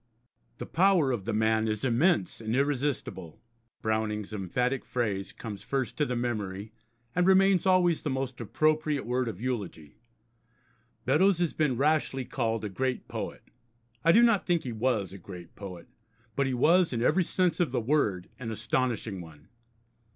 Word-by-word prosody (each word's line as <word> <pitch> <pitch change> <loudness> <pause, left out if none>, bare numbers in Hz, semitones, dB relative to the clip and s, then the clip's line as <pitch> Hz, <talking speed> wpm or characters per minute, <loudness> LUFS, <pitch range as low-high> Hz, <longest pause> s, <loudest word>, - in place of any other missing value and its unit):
'The - - -6
power 175 -5 +3
of 110 -6 -3
the 115 - -1
man 110 +1 +2
is 110 +2 -1
immense 120 - +2
and 110 +1 -2
irresistible.' 135 - -2 0.4
Browning's 110 -1 -1
emphatic 125 +7 -1
phrase 100 -6 -2
comes 105 -3 -8
first 135 -3 -2
to 150 - +2
the 125 - -2
memory, 110 -4 -3 0.4
and 180 +1 +3
remains 190 -1 +4
always 180 -3 +3
the 150 - -2
most 130 -2 -3
appropriate 155 +4 +1
word 125 +1 0
of 105 -5 -5
eulogy. 105 - -5 1.1
Beddoes 180 +8 +4
has 175 -2 0
been 150 -6 +1
rashly 140 -2 +1
called 115 -4 -2
a - - -1
great 130 +5 -2
poet. - - -6 0.6
I 165 - +6
do 230 +6 +6
not 230 -5 +3
think 175 -2 +2
he 125 - -4
was 110 -5 0
a 100 - -9
great 90 -2 -10
poet, 90 -4 -9 0.5
but 140 -1 +1
he 130 - -1
was, 170 +5 +4
in 115 -1 -1
every 180 +8 +3
sense 180 +1 0
of 175 -7 +1
the 125 - 0
word, 110 -8 0
an 120 -3 -5
astonishing 110 -3 -1
one. 80 -3 -14
125 Hz, 165 wpm, -28 LUFS, 110-150 Hz, 1.1 s, I